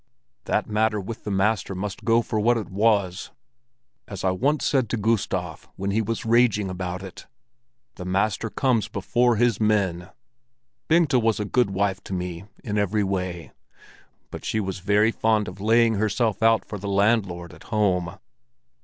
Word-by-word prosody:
That - - 0
matter 105 0 +1
with 105 +4 -7
the - - -3
master 100 0 0
must 95 +1 -5
go 115 0 +3
for 110 0 -2
what 120 +3 +3
it 110 - -5
was—as 95 - -3
I 95 - +2
once 140 +11 0
said 130 -6 +1
to 120 - -1
Gustav 110 0 -2
when 100 +1 -2
he 110 +3 +1
was 115 +3 -3
raging 110 -4 +3
about 90 0 -4
it; 95 - -10 0.7
the - - -6
master 100 +4 0
comes 115 -4 +1
before 120 +4 +1
his 115 -1 +2
men! 100 -5 0 0.8
Bengta 160 -6 +4
was 115 -1 +1
a 105 - -1
good 120 +1 +1
wife 95 0 -1
to - - -6
me 90 0 -4 0.2
in 105 -2 -1
every 105 +1 +1
way, 90 -3 -3 0.8
but - - -8
she - - -2
too 110 - 0
was 95 -1 -4
very 105 +4 +3
fond 110 -2 +1
of 95 +2 -8
laying 115 +2 +4
herself 110 +1 0
out 115 0 +4
for 105 - -7
the 100 - -6
landlord 100 -4 +1
at - - -15
home. 95 -6 0
105 Hz, 170 wpm, -24 LUFS, 95-115 Hz, 0.8 s, Bengta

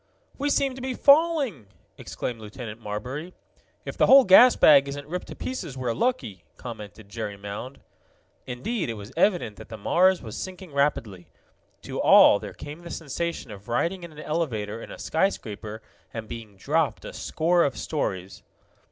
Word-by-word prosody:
"We 290 +1 0
seem 275 -2 +1
to 255 - -9
be 260 0 -3
falling!" 280 - +3 0.3
exclaimed 120 -2 -5
Lieutenant 110 +1 -8
Marbury. 125 - -6 0.5
"If - - -6
the - - +4
whole 270 0 +9
gas 240 +6 +8
bag 140 -2 +6
isn't 145 +1 -6
ripped 180 +3 -5
to - - -8
pieces 175 - -5
we're 125 -2 -1
lucky," 115 - -2
commented 110 -3 -9
Jerry 105 -1 -5
Mound. 105 +7 -7 0.7
Indeed, 150 - -3
it 115 - -3
was 100 0 -10
evident 170 - +1
that - - -12
the 110 - -7
Mars 185 - +3
was 110 -2 -7
sinking 185 -4 -7
rapidly. 115 -10 -1 0.6
To - - -4
all - - +7
there - - -8
came 150 +3 -9
the 175 0 -10
sensation 165 -2 -4
of 100 +1 -11
riding 170 +10 -1
in 170 -1 -9
an 150 - -16
elevator 125 -10 -3
in - - -9
a - - -9
skyscraper 110 - -2 0.3
and 115 -1 -6
being 110 -4 -9
dropped 155 +8 0
a - - -7
score 170 +2 +1
of 140 - -1
stories. 95 - -3
140 Hz, 170 wpm, -25 LUFS, 110-180 Hz, 0.7 s, whole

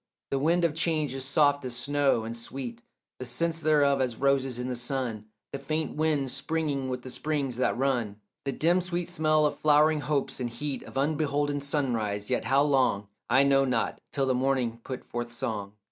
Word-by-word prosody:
The 135 - +1
wind 170 +4 +3
of 165 - +1
change 155 -4 0
is 135 0 -4
soft 145 0 +3
as 125 -2 -3
snow, 140 -1 +1
and 115 +1 -5
sweet 120 0 -6 0.4
The 130 - -5
sense 165 +5 -1
thereof 145 -3 +3
as 125 -3 0
roses 135 -1 +1
in 125 0 -3
the 125 - -2
sun, 120 -3 -3 0.3
The 140 - -4
faint 155 +3 -2
wind 150 -4 +1
springing 140 -1 -1
with 125 -1 -4
the 130 - -7
springs 140 -4 -2
that 130 - +1
run, 120 -6 0 0.2
The 140 - -1
dim 170 +6 +2
sweet 175 -1 -3
smell 155 -1 +2
of 150 - -1
flowering 150 0 +4
hopes, 145 -3 -1
and 125 -1 -2
heat 135 +4 -4
Of - - -9
unbeholden 145 0 0
sunrise; 115 -8 -1
yet 125 - 0
how 135 +1 +4
long 130 -8 +2 0.2
I 130 +3 +5
know 135 0 +4
not, 125 -4 -1
till 135 -2 0
the 130 - +2
morning 125 -3 0
put 130 -1 -6
forth 120 0 -4
song. 105 -4 -4
135 Hz, 190 wpm, -28 LUFS, 125-150 Hz, 0.4 s, I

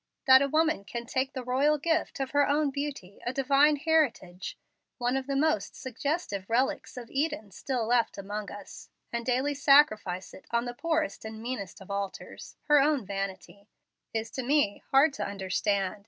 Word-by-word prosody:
That 260 -1 +8
a 280 - +2
woman 315 -7 +2
can 235 +3 -6
take 260 +2 -1
the 260 - -5
royal 275 +5 +2
gift 320 0 -1
of 270 -1 -2
her 285 0 +3
own 290 0 +2
beauty, 275 -9 -5
a 245 - -1
divine 275 +3 +4
heritage, 280 - 0 0.4
one 245 +1 0
of 270 0 -2
the 275 - -1
most 285 -7 +1
suggestive 260 - -3
relics 250 +2 0
of 240 -2 -8
Eden 270 -8 -2
still 250 +2 -2
left 235 -1 +1
among 205 0 -5
us, 205 -1 -10 0.2
and 235 0 -2
daily 260 +4 +1
sacrifice 265 -10 +3
it - - -14
on 235 +1 0
the 245 - -4
poorest 320 +2 -1
and 220 0 -7
meanest 225 -6 -5
of 195 - -10
altars 200 -1 -6
her 295 -1 +5
own 285 -5 +2
vanity 195 +1 -5 0.4
is 225 0 -3
to 260 - -3
me 260 -5 +1
hard 275 +2 +5
to - - -4
understand. 200 0 -1
250 Hz, 175 wpm, -29 LUFS, 205-285 Hz, 0.4 s, That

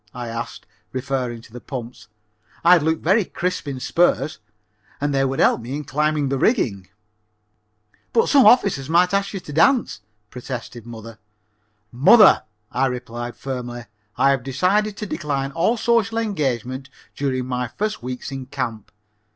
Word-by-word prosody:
I 120 -1 -5
asked, 115 +1 -6 0.3
referring 130 -3 -3
to 115 - -18
the 125 - -8
pumps. 125 -3 -8 0.6
"I'd 175 -1 +7
look 160 +1 0
very 200 +6 +3
crisp 180 -3 -3
in 135 -2 -4
spurs, 155 -1 +1 0.6
and 145 0 -1
they 135 0 +2
would 135 0 -1
help - - +3
me 125 +4 -5
in 150 - -4
climbing 150 0 0
the 135 -1 -1
rigging." 105 - +1 1.2
"But 230 - +3
some 275 -3 +6
officer 170 - +4
might 180 +3 +4
ask 200 0 +1
you 195 - -4
to 150 - -10
a - - -7
dance," 165 - +3 0.3
protested 120 -2 -7
mother. 115 -1 -10 0.7
"Mother," 190 - +6 0.3
I 135 - +1
replied 120 -1 -5
firmly, 120 -3 -6 0.3
"I 140 - +4
have 135 -2 +1
decided 190 - 0
to 210 - -4
decline 140 -7 -3
all 170 - +1
social 230 -1 +1
engagements 135 - -2 0.3
during 130 -3 -1
my 125 -1 -2
first 215 - -3
few - - -9
weeks 125 +1 -5
in 135 -1 -6
camp. 120 -6 -5
135 Hz, 160 wpm, -22 LUFS, 125-180 Hz, 1.2 s, I'd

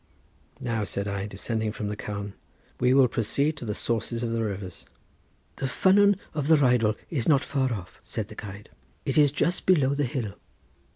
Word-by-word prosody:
"Now," 115 -5 -1
said 100 0 -3
I, 100 0 -2
descending 110 +2 -2
from 105 -1 -4
the 105 - -3
carn, 100 -1 -5 0.5
"we 125 0 +3
will 130 -1 +6
proceed 140 +7 0
to 125 - -6
the 105 -2 -2
sources 115 +1 -2
of 115 - -1
the 115 0 0
rivers." 100 -4 -5 0.7
"The 135 - -1
ffynnon 200 +8 +4 0.2
of 150 -2 -2
the 160 0 +6
Rheidol 125 -6 +3 0.2
is 135 -6 0
not 140 -3 +4
far 130 -2 0
off," 95 -5 -6
said 110 -3 -4
the 110 - -10
guide; 105 -1 -9 0.4
"it - - -1
is 145 -2 +5
just 170 +5 0
below 145 -7 +4
the 145 0 0
hill." 120 -5 -3
115 Hz, 185 wpm, -27 LUFS, 105-140 Hz, 0.7 s, will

